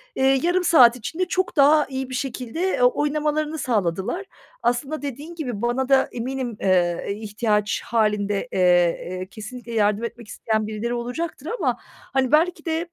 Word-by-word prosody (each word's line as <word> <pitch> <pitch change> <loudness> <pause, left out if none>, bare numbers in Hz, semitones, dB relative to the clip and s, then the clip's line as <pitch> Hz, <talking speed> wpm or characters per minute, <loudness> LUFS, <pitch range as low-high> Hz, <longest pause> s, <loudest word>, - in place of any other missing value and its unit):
eee, 265 0 +3
yarım 355 +2 +2
saat 250 -9 +7
içinde 285 +11 -3
çok 370 +1 -1
daha 295 +2 +6
iyi 265 -1 -4
bir 255 - -4
şekilde, 250 +1 -4
eee, 375 -8 0
oynamalarını 300 +3 +1
sağladılar. 210 - -1 0.4
Aslında 270 +6 -1
dediğin 290 +4 -6
gibi 250 -10 -4
bana 245 +2 0
da 270 -1 +4
eminim, 245 -1 -4
eee, 175 -2 +2
e, - - -1
ihtiyaç 210 0 -1
hâlinde, 210 -2 0
eee, - - -2 0.5
eee, 185 0 -5
kesinlikle 235 +2 -9
yardım 210 0 +2
etmek 235 -1 -6
isteyen 220 -1 -2
birileri 220 +2 -3
olacaktır 255 +5 -4
ama, - - 0 0.4
hani, 265 -1 +1
belki 320 +2 +2
de 330 +1 -2
250 Hz, 160 wpm, -23 LUFS, 220-300 Hz, 0.5 s, saat